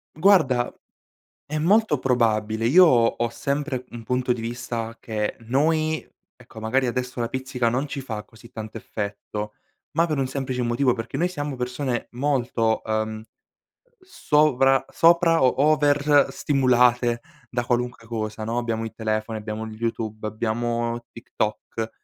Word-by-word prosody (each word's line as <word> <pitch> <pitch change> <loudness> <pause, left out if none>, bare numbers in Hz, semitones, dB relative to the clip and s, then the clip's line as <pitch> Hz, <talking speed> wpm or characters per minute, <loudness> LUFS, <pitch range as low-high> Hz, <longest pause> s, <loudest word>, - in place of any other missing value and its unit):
Guarda, 155 -9 +4 0.7
è 155 +1 -3
molto 195 0 +3
probabile, 115 -3 +1
io 180 +7 +8
ho 120 -7 +5
ho 120 0 -1
sempre, 140 0 -2
mhmm, 120 - -8
un 115 - -9
punto 125 +1 0
di 115 - -6
vista, 115 -1 -4
che 105 -2 -3
noi 155 +6 0 0.3
ecco, 110 - -12
magari 125 +4 +1
adesso 125 +1 -3
la 115 - 0
pizzica 130 -2 -2
non 130 +5 -1
ci 140 - -5
fa 110 -5 -5
così 115 +1 -17
tanto 110 0 -7
effetto, 105 0 -5 0.4
ma 165 +1 +2
per 155 -4 -1
un 130 - 0
semplice 130 -2 -3
motivo, 120 +2 +2
perché 115 -1 -5
noi 175 - +2
siamo 145 -5 -4
persone 125 0 -2
molto, 120 -4 0
ehm, 110 0 -2 0.8
sovra 150 - +3
sopra 165 -2 +4
o 130 - +5 0.2
over 145 -1 +4
stimolate 125 -3 +3 0.3
da 120 -1 -1
qualunque 120 -1 -2
cosa, 110 -1 -4
no: 115 +2 -2
abbiamo 115 -2 -2
il 110 - -6
telefono, 110 0 -2
abbiamo 110 +1 -5
YouTube, 110 -1 -4
abbiamo 115 +2 -2
TikTok; 110 0 -4
120 Hz, 145 wpm, -24 LUFS, 115-140 Hz, 0.8 s, io